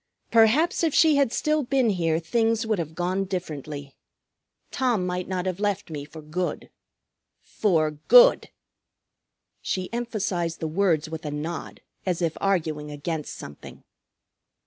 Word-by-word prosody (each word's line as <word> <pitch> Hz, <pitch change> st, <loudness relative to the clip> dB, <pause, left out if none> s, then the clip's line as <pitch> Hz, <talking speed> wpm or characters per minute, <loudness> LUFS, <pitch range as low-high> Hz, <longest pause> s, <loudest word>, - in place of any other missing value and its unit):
Perhaps 240 Hz, +12 st, +4 dB
if 320 Hz, -3 st, +1 dB
she 315 Hz, -3 st, +5 dB
had 275 Hz, -5 st, +3 dB
still 305 Hz, +3 st, +1 dB
been 260 Hz, -3 st, +2 dB
here 165 Hz, -4 st, +1 dB
things 225 Hz, +7 st, 0 dB
would 215 Hz, -4 st, 0 dB
have 160 Hz, -1 st, -4 dB
gone 180 Hz, +3 st, 0 dB
differently. 150 Hz, -7 st, -6 dB, 0.8 s
Tom 240 Hz, -8 st, +1 dB
might 180 Hz, 0 st, -3 dB
not 185 Hz, -1 st, -2 dB
have 185 Hz, 0 st, -2 dB
left 205 Hz, -4 st, -1 dB
me 145 Hz, -2 st, -5 dB
for 155 Hz, +1 st, -11 dB
good. 175 Hz, +4 st, -4 dB, 0.7 s
For 160 Hz, -7 st, +1 dB
good." -, -, +6 dB, 1.1 s
She 185 Hz, +3 st, -3 dB
emphasized 200 Hz, -8 st, -2 dB
the 160 Hz, -, -2 dB
words 165 Hz, -2 st, +1 dB
with 160 Hz, 0 st, -7 dB
a 150 Hz, -, -3 dB
nod 155 Hz, +3 st, -5 dB, 0.2 s
as 180 Hz, -3 st, -1 dB
if 165 Hz, -2 st, 0 dB
arguing 155 Hz, -6 st, 0 dB
against 150 Hz, +1 st, -4 dB
something. 70 Hz, -, -11 dB
180 Hz, 140 wpm, -25 LUFS, 160-225 Hz, 1.1 s, good